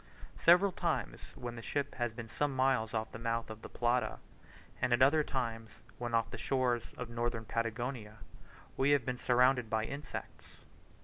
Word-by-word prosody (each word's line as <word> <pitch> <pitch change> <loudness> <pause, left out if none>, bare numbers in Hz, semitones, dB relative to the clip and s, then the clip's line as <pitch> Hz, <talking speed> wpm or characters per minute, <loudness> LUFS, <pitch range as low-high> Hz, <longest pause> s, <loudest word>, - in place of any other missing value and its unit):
Several 180 +4 +6
times - - -2
when 120 -1 -6
the 115 - -7
ship 140 +4 -2
has 120 -2 -1
been 115 0 -7
some 145 +4 -1
miles 130 -4 +2
off 110 -1 -2
the - - -8
mouth 115 -1 -2
of 110 0 -9
the - - -9
Plata, 120 +1 0 0.6
and 125 -1 +2
at 120 - +3
other 150 +3 +5
times 115 -5 -3 0.3
when 120 -1 -1
off 115 0 +1
the - - -6
shores 125 -3 +1
of 125 - -4
Northern 115 -1 -2
Patagonia, 115 0 -3 0.6
we 135 +2 +2
have 125 - -11
been 125 -1 -2
surrounded 125 -1 +3
by 110 0 +1
insects. 140 +4 -7
120 Hz, 175 wpm, -33 LUFS, 115-130 Hz, 0.6 s, Several